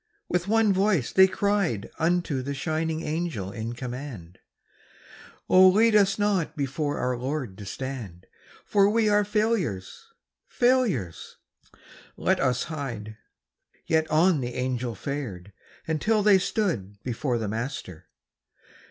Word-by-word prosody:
With 180 +1 -1
one 220 -1 +3
voice 190 - +1
they 190 0 +7
cried 195 - -1
Unto 165 -4 +1
the 140 +2 -4
shining 160 +2 -2
Angel 150 - -3
in 115 +1 -5
command: 120 - -7 1.1
'Oh, 185 0 +7
lead 215 +4 +4
us 195 -2 +4
not 195 -7 0
before 145 +1 -2
our 125 0 -1
Lord 130 -4 -4
to 100 - -8
stand, 115 -8 -6 0.4
For 200 -1 +4
we 220 0 +2
are 205 0 +4
failures, 210 - -1 0.4
failures! 240 - 0 0.8
Let - - +1
us 125 -2 +1
hide.' 120 -9 -6 0.7
Yet 160 0 +1
on 160 0 +3
the 120 -1 -4
Angel 125 -2 -2
fared, 105 -8 -6 0.3
until 205 +7 +1
they 200 -2 +6
stood 145 - -2
Before 125 0 -1
the 110 -2 -3
Master. 110 - -5
150 Hz, 125 wpm, -26 LUFS, 120-195 Hz, 1.1 s, they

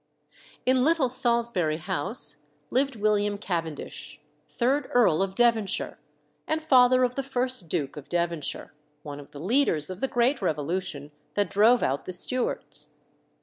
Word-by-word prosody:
In 255 0 +3
Little 310 -3 +2
Salisbury 235 -10 +2
House 150 -1 +1 0.3
lived 270 +1 +1
William 205 -1 +1
Cavendish, 165 -6 -5 0.3
third 265 +4 0
Earl 205 -9 +3
of 190 0 -2
Devonshire, 230 -4 +1 0.5
and 315 - 0
father 255 -4 +4
of 250 0 +1
the 275 - -2
first 255 -8 -1
Duke 150 -6 -2
of 150 - -10
Devonshire, 170 -3 -2 0.3
one 145 -1 -7
of 140 - -12
the 145 - -11
leaders 185 - +1
of 185 - -8
the 270 - +1
great 245 +2 +1
revolution 155 -2 -3 0.2
that 205 -1 0
drove 225 +4 +4
out 135 +2 -1
the 185 - -5
Stuarts. 250 +7 -1
205 Hz, 145 wpm, -26 LUFS, 160-255 Hz, 0.5 s, father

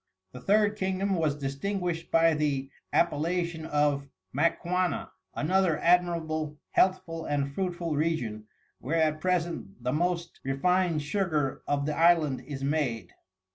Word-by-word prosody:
The 125 - -10
Third 210 +4 +3
Kingdom 190 0 0
was 160 -5 +1
distinguished 165 +5 -3
by 165 0 +4
the 140 -3 -1 0.2
Appellation 170 0 0
of 145 -2 +1 0.2
Maquana, 180 - 0 0.2
another 180 0 +2
admirable, 165 -3 +1
healthful 165 -3 +1
and 140 -1 -1
fruitful 175 -2 -2
Region, 120 -9 -1 0.3
where 160 +5 -1
at 155 -1 +1
present 170 - -2
the 125 - 0
most 170 +1 -1
refined 165 +4 +1
sugar 155 -4 -1
of 140 -1 0
the 150 0 -1
Island 165 -5 +4
is 135 -2 -5
made. 135 - -1
160 Hz, 125 wpm, -28 LUFS, 145-180 Hz, 0.3 s, by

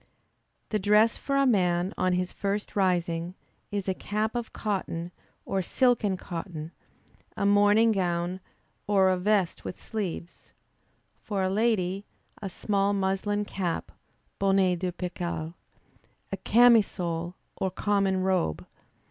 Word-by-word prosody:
The 215 - 0
dress 210 +3 +4
for 275 - -3
a 275 - +4
man 180 -5 +2
on 185 0 +1
his 180 0 -1
first 200 +1 -3
rising, 175 -2 0 0.3
is 200 -2 -3
a 190 - +2
cap 215 +3 -2
of 240 -2 -4
cotton, 180 -5 -3 0.3
or 195 - 0
silk 245 +6 +2
and 195 -3 +1
cotton, 165 -3 -6 0.7
a - - 0
morning 205 +3 +5
gown, 180 -2 -1 0.5
or 195 -2 +4
a 185 - +2
vest 200 -2 +1
with - - -6
sleeves; 190 -6 -5 0.7
for 200 -3 -2
a 185 - +1
lady, 200 -3 0 0.3
a 195 - -4
small 200 +1 0
muslin 200 +1 0
cap, 180 -4 -3 0.5
(bonnet 195 -2 +3
de 185 0 -1
percale,) 175 -2 -4 0.8
a - - -2
camisole 185 -8 +3 0.2
or 190 - 0
common 195 0 +1
robe. 185 - 0
190 Hz, 130 wpm, -27 LUFS, 180-205 Hz, 0.8 s, morning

